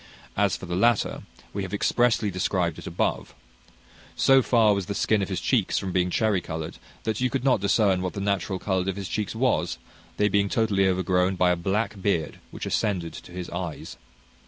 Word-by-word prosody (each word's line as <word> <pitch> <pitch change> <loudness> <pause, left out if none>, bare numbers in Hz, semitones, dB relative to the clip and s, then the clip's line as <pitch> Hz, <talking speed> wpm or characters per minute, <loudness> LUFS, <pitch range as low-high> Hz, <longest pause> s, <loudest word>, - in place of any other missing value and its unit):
As 100 -2 +2
for - - -9
the 85 0 -3
latter, 115 +3 +2 0.3
we 100 - -2
have 95 +1 -3
expressly 115 -1 +2
described 90 0 -1
it - - -9
above. - - -2 0.8
So 135 0 +5
far 115 -4 +4
was 100 -3 -2
the 100 - -3
skin 110 0 +2
on 95 - -1
his 95 -3 -2
cheeks 110 0 +1
from 95 -2 -2
being 90 0 +1
cherry 105 -1 +1
coloured, 80 -1 -6 0.2
that 110 +2 -2
you 125 - +2
could 135 -1 -2
not 130 -7 +3
discern 100 -2 +3
what 90 0 -3
the - - -5
natural 100 -1 -1
colour 95 0 -1
of 95 - -2
his 100 -2 -5
cheeks 105 0 -3
was, 110 -8 +1 0.4
they 105 - +3
being 100 -1 +2
totally 100 -4 +2
overgrown 95 0 +1
by 90 0 +3
a - - +2
black 95 +3 -2
beard, 90 -5 -1
which - - -7
ascended 90 -7 -1
to 90 - -11
his 90 0 -6
eyes. 85 -3 -5
95 Hz, 200 wpm, -25 LUFS, 90-105 Hz, 0.8 s, So